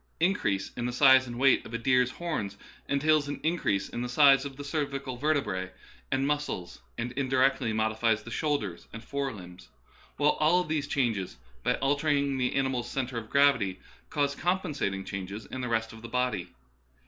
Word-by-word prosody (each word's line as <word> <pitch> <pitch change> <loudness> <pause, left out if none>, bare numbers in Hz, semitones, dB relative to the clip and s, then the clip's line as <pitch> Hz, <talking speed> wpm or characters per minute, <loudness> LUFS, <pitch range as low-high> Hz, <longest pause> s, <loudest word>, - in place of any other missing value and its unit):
Increase 160 - +1
in 120 -1 -2
the - - -2
size 130 0 +6
and 120 -1 -6
weight 135 +1 +4
of 115 - -7
a - - +1
deer's 125 +1 +3
horns 125 - -4 0.3
entails 150 +1 +3
an 145 - -4
increase 105 - 0
in 120 - -5
the 125 - -3
size 135 +1 +6
of 135 -2 -7
the 145 - -6
cervical 140 -3 -3
vertebrae 130 -10 -1 0.4
and 135 +1 +1
muscles, 145 -11 -2 0.2
and 120 +1 -3
indirectly 130 -2 +1
modifies 110 0 +1
the 120 - -9
shoulders 130 - -2
and 115 +1 -8
fore 140 +1 -2
limbs; 90 -4 -12 0.5
while 150 +1 +3
all 170 +4 +4
these 155 -3 -2
changes, 115 - -1 0.2
by - - +1
altering 140 -1 +1
the 125 0 0
animal's 130 -3 0
centre 125 -2 -2
of 110 -1 -11
gravity, 140 -10 +3 0.3
cause 145 -1 0
compensating 145 - -1
changes 100 +2 -6
in 130 - -6
the 125 - -3
rest 115 -1 -1
of 110 - -12
the 115 - -8
body. 125 -7 -1
130 Hz, 175 wpm, -28 LUFS, 115-145 Hz, 0.5 s, size